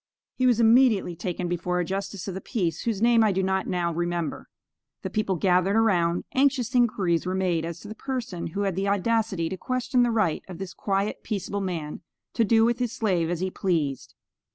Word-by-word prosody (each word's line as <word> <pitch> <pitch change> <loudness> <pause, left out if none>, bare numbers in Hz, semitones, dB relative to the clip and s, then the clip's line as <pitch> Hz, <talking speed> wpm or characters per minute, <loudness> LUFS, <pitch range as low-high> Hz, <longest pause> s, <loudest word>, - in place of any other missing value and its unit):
He 255 - +1
was 240 -2 +3
immediately 225 -6 +4
taken 175 +1 -3
before 175 +1 -1
a 175 - 0
Justice 195 +1 -4
of 190 - -3
the 190 - -6
Peace, 175 - -2
whose 225 -2 -1
name 235 -1 +5
I 215 - +3
do 190 0 0
not 190 0 0
now 175 -2 -1
remember. 175 0 -3 0.5
The - - -4
people 210 -3 0
gathered 185 +3 +2
around; 175 -6 +2
anxious 260 -2 +2
inquiries 195 -9 +2
were 185 - -1
made 175 -4 0
as 170 0 -6
to - - -10
the 215 - -6
person 230 -8 -4
who 195 +5 -4
had 195 -3 0
the 195 +2 -1
audacity 200 -3 +1
to 190 - -5
question 255 +4 0
the 240 - +3
right 215 -9 +1
of 180 -3 -8
this 190 -1 -6
quiet, 200 +1 -1
peaceable 200 -1 -3
man 165 -6 -4 0.3
to 230 - +2
do 225 +1 +4
with 240 +1 +1
his 245 -3 -1
slave 185 -9 0
as 175 0 -2
he 185 0 -1
pleased. 155 -10 -2
195 Hz, 205 wpm, -26 LUFS, 175-225 Hz, 0.5 s, name